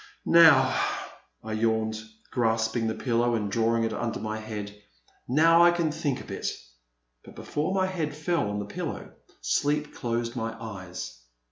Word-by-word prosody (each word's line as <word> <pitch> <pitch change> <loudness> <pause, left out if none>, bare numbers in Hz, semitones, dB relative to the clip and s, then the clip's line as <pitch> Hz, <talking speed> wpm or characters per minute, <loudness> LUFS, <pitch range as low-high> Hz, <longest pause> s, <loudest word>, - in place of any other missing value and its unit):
"Now," 165 -3 +7 0.7
I 110 0 -5
yawned, 110 0 0 0.3
grasping 115 -1 +1
the 110 - -1
pillow 120 -1 +1
and 105 -3 -2
drawing 115 +1 +2
it 115 - -1
under 120 -1 -3
my 110 0 -4
head, 105 -2 -6 0.5
now, 165 +6 +5
I 175 - +8
can 170 -2 +1
think 150 -4 -2
a - - -11
bit," - - -4 0.8
but - - -14
before 150 +5 -2
my 190 -1 +2
head 165 -6 -3
fell 155 - 0
on 105 - -3
the 105 - -3
pillow, 100 - -5 0.3
sleep 145 - 0
closed 120 0 -2
my 115 -1 -4
eyes. 95 - -7
115 Hz, 155 wpm, -27 LUFS, 110-150 Hz, 0.8 s, I